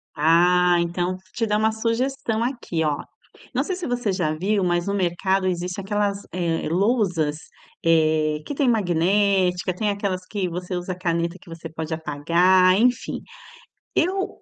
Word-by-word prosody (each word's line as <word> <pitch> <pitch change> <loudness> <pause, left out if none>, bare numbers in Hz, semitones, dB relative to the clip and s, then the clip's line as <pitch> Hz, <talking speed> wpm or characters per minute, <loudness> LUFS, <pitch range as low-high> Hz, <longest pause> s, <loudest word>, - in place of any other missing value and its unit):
Ah, 175 +3 +4
então 175 +1 -1
vou 185 - -9
te 225 - 0
dar 210 0 +1
uma 220 +1 +2
sugestão 230 +1 -1
aqui, 235 -10 -2
ó. 150 -2 -1 0.5
Não - - +1
sei 375 - -3
se 360 -4 -5
você 245 -4 -1
já 175 -5 0
viu, 195 +4 0
mas 175 -1 +1
no 200 - -1
mercado 190 +1 0
existem 180 +1 -3
aquelas, 205 0 -1
eh, 170 -3 -1
lousas, 180 -5 +1 0.5
eh, 155 -2 +3
que - - -4
tem 270 -2 +2
magnética, 190 -2 +2
tem 210 +3 0
aquelas 200 -2 -2
que 200 -3 -2
você 180 +1 -4
usa 180 +1 -3
caneta 170 0 -2
que - - -16
você 165 0 -8
pode 160 0 -5
apagar, 175 +5 +3
enfim. 245 0 +1 0.7
Eu 380 +3 -1
185 Hz, 160 wpm, -23 LUFS, 170-210 Hz, 0.7 s, Ah